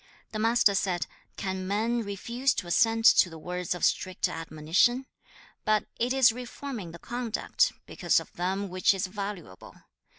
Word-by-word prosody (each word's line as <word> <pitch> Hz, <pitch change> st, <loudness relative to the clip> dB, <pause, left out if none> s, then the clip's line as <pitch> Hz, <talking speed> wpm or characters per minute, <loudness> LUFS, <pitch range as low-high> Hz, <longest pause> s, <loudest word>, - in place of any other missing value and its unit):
The 215 Hz, -, -4 dB
Master 225 Hz, -2 st, +4 dB
said, 180 Hz, -2 st, 0 dB, 0.3 s
'Can 190 Hz, -1 st, -3 dB
men 225 Hz, +4 st, 0 dB
refuse 235 Hz, +6 st, -1 dB
to -, -, -3 dB
assent 225 Hz, +5 st, +2 dB
to 185 Hz, -, +5 dB
the 165 Hz, -, -10 dB
words 180 Hz, +2 st, -3 dB
of 175 Hz, -, 0 dB
strict 185 Hz, -1 st, 0 dB
admonition? 165 Hz, +11 st, +1 dB, 0.6 s
But 215 Hz, -1 st, +2 dB
it 240 Hz, +2 st, +1 dB
is 265 Hz, -2 st, +5 dB
reforming 245 Hz, -4 st, -7 dB
the 165 Hz, -, -10 dB
conduct 245 Hz, -, -1 dB
because -, -, +1 dB
of -, -, -12 dB
them 190 Hz, +3 st, -2 dB
which 185 Hz, +2 st, +2 dB
is 190 Hz, -, -1 dB
valuable. 195 Hz, -, -7 dB
200 Hz, 155 wpm, -28 LUFS, 180-235 Hz, 0.6 s, to